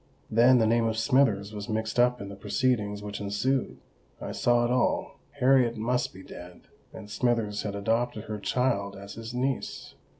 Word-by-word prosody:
Then 120 +3 +6
the 115 - +3
name 115 +1 +2
of 110 -1 -2
Smithers 110 -5 +2
was 105 +1 -6
mixed 110 +2 -2
up 125 0 +3
in 100 - -7
the 100 - -8
proceedings 105 -3 -1
which 105 0 -6
ensued: 115 +7 -1 0.4
I - - -5
saw 120 0 +2
it 120 - -1
all—Harriet 125 0 +1
must 125 +3 0
be 95 - -12
dead, 90 -1 -11 0.3
and 110 -2 -10
Smithers 110 -2 0
had 100 -1 -4
adopted 115 +2 -1
her 110 -1 -5
child 100 -1 0
as 100 +1 -9
his 115 +2 -7
niece! 130 +1 -3
115 Hz, 170 wpm, -27 LUFS, 105-125 Hz, 0.4 s, Then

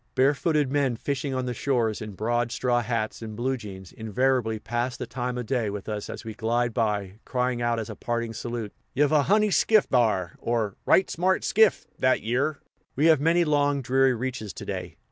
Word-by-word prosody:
Barefooted 145 +1 +2
men 140 -4 +1
fishing 140 +2 -3
on 130 0 -1
the 125 - -2
shores, 120 -5 0
in 105 -1 -6
broad 120 +3 -1
straw 120 -1 +1
hats, 115 -1 -2
and 110 -1 -6
blue 130 +4 0
jeans, 95 -6 -9
invariably 115 +1 0
"pass 120 +3 -3
the - - -4
time 125 +1 -4
o' 125 - -2
day" 115 -2 -1
with 100 -1 -6
us 105 -1 -4
as - - -7
we 110 - -5
glide 120 +2 0
by, 105 -3 -1
crying 125 -1 -1
out 120 -1 +1
as 110 - -4
a - - -7
parting 120 -1 -3
salute, 115 -3 -5 0.2
"Ye've 145 +2 +3
a 155 -2 +5
honey 210 +6 +3
skiff, 215 +2 +4
thar!" 105 -8 +1
or, 115 -4 -1
"Right 190 - +5
smart 185 +2 +1
skiff, 220 0 +3
thet 130 0 +2
yere!" 130 +6 0 0.4
We 145 - +2
have 145 - -2
many 170 +3 +3
long, 145 -2 +1
dreary 130 +1 +3
reaches 120 -5 -4
to - - -8
day. - - -5
120 Hz, 200 wpm, -26 LUFS, 110-135 Hz, 0.4 s, a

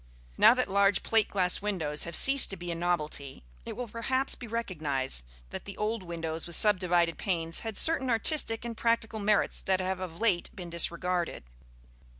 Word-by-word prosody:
Now 230 - +6
that 255 - -1
large 200 0 +2
plate 225 -2 +1
glass 180 -2 0
windows 165 -8 -2
have 170 -1 -3
ceased 275 0 +6
to 195 - -4
be 175 0 -6
a - - -3
novelty, 155 - -3 0.2
it - - -5
will 245 - -5
perhaps 260 +4 -2
be 240 - -8
recognized 150 - -2 0.3
that - - -7
the 200 - -9
old 215 +1 -2
window 165 -3 -5
with 165 +1 -3
subdivided 180 -4 +3
panes 165 -4 -2
had 225 -3 -6
certain 320 -5 +4
artistic 230 -1 +1
and 235 -1 -5
practical 230 -1 -1
merits 210 0 0
that 190 -1 0
have 185 0 -2
of 180 -2 -7
late 200 -6 +2
been 175 -3 -8
disregarded. 170 +1 -1
190 Hz, 175 wpm, -28 LUFS, 170-225 Hz, 0.3 s, Now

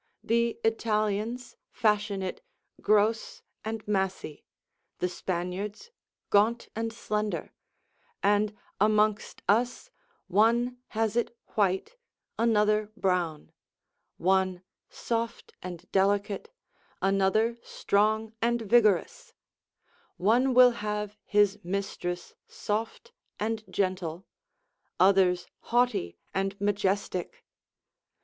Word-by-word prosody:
The 235 0 +1
Italians 220 +2 -1
fashion 210 -4 +1
it 185 - -5 0.4
gross 215 +2 +1 0.2
and 220 -1 -5
massy; 190 -6 -2 0.5
the 180 - 0
Spaniards 185 - -4 0.4
gaunt 220 +4 +3
and 225 +1 -2
slender; 215 -2 -3 0.7
and 205 +1 +2 0.2
amongst 210 0 +2
us 240 - +1 0.3
one 235 +5 +2
has 220 0 -1
it 240 0 -1 0.2
white, 200 - 0 0.4
another 215 -2 +2
brown; 175 -5 -1 0.7
one 185 0 +1 0.3
soft 230 0 -3
and 175 -1 -7
delicate, 200 - +1 0.5
another 195 +4 +2
strong 215 +2 0
and 235 0 +1
vigorous; 235 - +2 0.8
one 240 +7 +3
will 250 0 +8
have 210 -2 -3
his 205 0 +3
mistress 180 -1 -4
soft 225 - -4 0.3
and 220 +1 -2
gentle, 185 -3 -2 0.7
others 185 -2 +4
haughty 235 - 0 0.2
and 195 +1 -2
majestic. 200 -2 -1
210 Hz, 85 wpm, -28 LUFS, 195-225 Hz, 0.8 s, will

